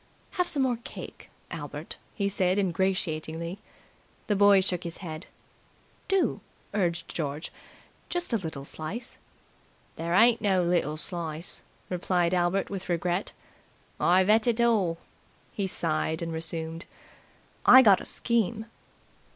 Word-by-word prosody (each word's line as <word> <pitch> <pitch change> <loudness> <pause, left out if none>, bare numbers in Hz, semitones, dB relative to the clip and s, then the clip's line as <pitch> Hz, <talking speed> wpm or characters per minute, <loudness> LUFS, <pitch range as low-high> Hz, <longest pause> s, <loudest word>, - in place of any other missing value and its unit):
"Have 360 -1 0
some 285 -5 +1
more 250 -2 +1
cake, - - -9 0.2
Albert," - - -6 0.2
he 200 -2 0
said 185 -1 +1
ingratiatingly. 170 -2 -1 0.7
The 210 - +1
boy 200 -1 +6
shook 180 -2 -1
his 170 -1 -6
head. 165 -1 -7 0.8
"Do," 390 -2 +1 0.3
urged 175 -5 0
George. 150 -1 -3 0.6
"Just 350 -7 -2
a - - +4
little 160 -6 -6
slice." 195 - -5 0.8
"There 170 +1 -1
ain't 230 +3 +5
no 190 -3 +3
little 170 -3 +1
slice," 165 -1 -3 0.3
replied 180 -1 0
Albert 180 +2 +1
with 190 -2 -5
regret. 175 +2 0 0.7
"I've 185 +2 +4
ate 215 +2 +4
it 235 -1 +2
all." 210 -8 +3 0.6
He 200 -2 -1
sighed 160 -2 -1
and 165 -1 -4
resumed. 165 0 -5 0.8
"I 260 +1 +9
gotta 200 -5 +5
scheme!" 230 -2 0
180 Hz, 125 wpm, -28 LUFS, 165-205 Hz, 0.8 s, I